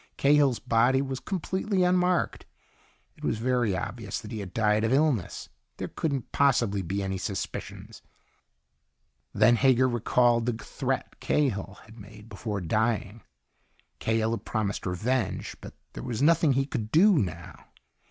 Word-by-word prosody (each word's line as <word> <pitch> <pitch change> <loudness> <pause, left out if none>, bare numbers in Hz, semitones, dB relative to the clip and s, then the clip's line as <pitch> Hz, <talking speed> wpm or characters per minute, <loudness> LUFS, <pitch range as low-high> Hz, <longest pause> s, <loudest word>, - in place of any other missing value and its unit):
Cahill's 140 -3 +4
body 120 +5 +2
was 135 -1 -3
completely 190 +2 -1
unmarked. 180 -1 +1 0.7
It - - -17
was - - 0
very 120 -4 0
obvious 105 0 -5
that 105 - -10
he 110 - -4
had 100 -3 -7
died 105 +1 +2
of 115 - +1
illness. 135 - 0 0.3
There - - -5
couldn't 140 -6 -3
possibly 120 -8 +2
be 95 +3 -3
any 95 -1 -3
suspicions. 95 0 -6 1.3
Then 120 0 +4
Hager 130 0 +4
recalled 120 0 +2
the 120 - +1
threat 110 - -4
Cahill 100 -9 -1
had 110 +1 -15
made 105 +2 -13
before 105 -1 -4
dying. 110 +3 -1 0.8
Cahill 110 0 0
had 115 -3 -3
promised 105 -4 -2
revenge, 110 +4 -2
but - - -10 0.2
there - - -7
was 120 -4 -4
nothing 165 -2 +4
he 135 +1 +1
could 110 -5 -4
do 180 +3 +5
now. 85 -5 -5
115 Hz, 140 wpm, -27 LUFS, 105-135 Hz, 1.3 s, do